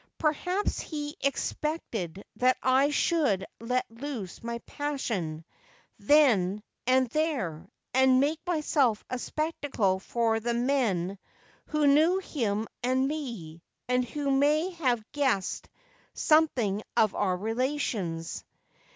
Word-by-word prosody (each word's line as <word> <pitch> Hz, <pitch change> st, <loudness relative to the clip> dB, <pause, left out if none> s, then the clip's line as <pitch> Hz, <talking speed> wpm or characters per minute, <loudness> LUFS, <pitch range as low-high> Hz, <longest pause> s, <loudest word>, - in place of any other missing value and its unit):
Per 305 Hz, -1 st, +2 dB
haps 365 Hz, +7 st, -1 dB
he 295 Hz, -1 st, -5 dB
expected 245 Hz, -, -2 dB
that 255 Hz, +1 st, +3 dB
I 265 Hz, +2 st, +4 dB
should 290 Hz, -, +1 dB
let 250 Hz, +2 st, 0 dB
loose 230 Hz, -6 st, -6 dB
my 235 Hz, 0 st, -3 dB
passion 210 Hz, -, -3 dB, 0.5 s
then 210 Hz, -6 st, +4 dB, 0.2 s
and 260 Hz, 0 st, +4 dB
there, 225 Hz, -, -1 dB, 0.3 s
and 260 Hz, 0 st, +5 dB
make 300 Hz, +4 st, +1 dB
myself 295 Hz, -9 st, +1 dB
a 255 Hz, -, -2 dB
spectacle 280 Hz, -, -1 dB
for 225 Hz, +2 st, 0 dB
the 235 Hz, +1 st, -1 dB
men 225 Hz, -8 st, 0 dB, 0.5 s
who 305 Hz, -1 st, +1 dB
knew 310 Hz, +6 st, +5 dB
him 225 Hz, -, -2 dB
and 260 Hz, +2 st, +2 dB
me, 230 Hz, -, -5 dB, 0.3 s
and 250 Hz, 0 st, +2 dB
who 280 Hz, +4 st, -2 dB
may 300 Hz, +6 st, +3 dB
have 255 Hz, -10 st, 0 dB
guessed 265 Hz, -10 st, 0 dB, 0.5 s
something 255 Hz, -11 st, +3 dB, 0.2 s
of 215 Hz, -3 st, +4 dB
our 185 Hz, -3 st, 0 dB
relations. 220 Hz, -, -2 dB
255 Hz, 115 wpm, -28 LUFS, 210-295 Hz, 0.5 s, and